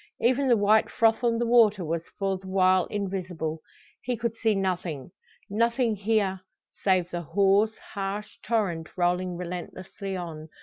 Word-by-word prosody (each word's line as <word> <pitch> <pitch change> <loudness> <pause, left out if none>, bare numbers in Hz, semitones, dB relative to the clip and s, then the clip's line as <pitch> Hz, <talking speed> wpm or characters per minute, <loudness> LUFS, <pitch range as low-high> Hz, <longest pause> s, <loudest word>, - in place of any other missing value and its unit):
Even 260 +3 +2
the 240 -2 +5
white 210 +1 +4
froth 225 +1 +2
on 235 -1 +2
the 240 - 0
water 220 -6 +4
was 165 +1 -3
for 195 -1 0
the 190 0 -10
while 185 -1 +3
invisible. 185 -5 -3 0.4
He 250 -1 -2
could 235 0 -2
see 225 -2 +1
nothing 180 -7 -2 0.4
nothing 230 +2 +1
hear, 200 -2 0 0.4
save 185 -2 +2
the 175 - -3
hoarse, 200 +6 +2 0.2
harsh 200 +1 -4
torrent 190 -8 -1
rolling 180 0 0
relentlessly 180 +2 -6
on. 160 -3 -7
195 Hz, 145 wpm, -27 LUFS, 180-220 Hz, 0.4 s, the